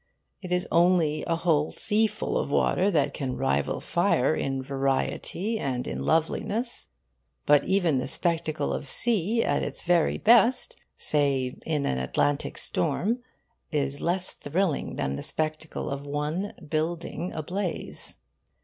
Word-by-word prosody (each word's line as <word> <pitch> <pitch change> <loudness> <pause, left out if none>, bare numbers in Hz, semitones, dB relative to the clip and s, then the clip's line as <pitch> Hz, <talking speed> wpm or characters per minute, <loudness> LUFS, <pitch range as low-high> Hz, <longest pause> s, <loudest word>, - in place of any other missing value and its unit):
It 180 -2 -7
is 180 0 0
only 170 -3 +3
a 165 - +1
whole 165 -3 +1
seaful 215 0 0
of - - 0
water 185 +6 +2
that 145 -6 +1
can 130 -3 -3
rival 130 - 0
fire - - +2
in 135 +10 -2
variety 135 - -1
and 125 -6 -2
in 65 - -4
loveliness. 210 - 0 0.6
But 145 -1 +5
even 180 -8 +2
the 130 - -3
spectacle 165 +1 -1
of 145 - -4
sea 225 - +3
at - - +1
its - - -3
very 175 -2 +2
best 240 +2 +4 0.2
say 135 -4 0
in 150 -3 0
an 65 - 0
Atlantic 140 - 0
storm 190 - +1 0.5
is 140 -1 -1
less 180 +2 0
thrilling 165 +2 -1
than 70 - -2
the - - -5
spectacle 155 0 -2
of 140 +1 -5
one 150 +7 -2
building 165 +3 -2
ablaze. 180 +4 -3
160 Hz, 135 wpm, -27 LUFS, 140-185 Hz, 0.6 s, But